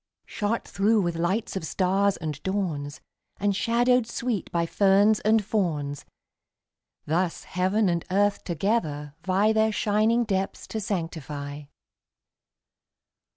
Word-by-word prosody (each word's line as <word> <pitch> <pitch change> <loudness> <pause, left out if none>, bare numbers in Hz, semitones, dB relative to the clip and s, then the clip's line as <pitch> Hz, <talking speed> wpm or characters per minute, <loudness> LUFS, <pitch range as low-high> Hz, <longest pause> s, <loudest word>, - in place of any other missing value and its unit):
Shot 215 +2 -2
through 210 +1 +2
with 175 -1 -1
lights 190 +7 -1
of 190 - -3
stars 195 +4 +1
and 155 -3 -5
dawns, 160 -7 -3 0.4
And 200 -1 0
shadowed 240 +2 +2
sweet 235 -6 -3
by 170 -1 +1
ferns 200 +4 +4
and 215 -1 +2
fawns, 150 -9 -2 1.0
Thus 170 +3 -1
heaven 190 +4 +1
and 170 -2 0
earth 200 +2 +1
together 160 -6 -1
vie 195 +4 +2
Their 220 0 +3
shining 215 +3 +2
depths 195 -3 -2
to 220 - -3
sanctify. 150 -6 -4
195 Hz, 115 wpm, -26 LUFS, 165-215 Hz, 1.0 s, ferns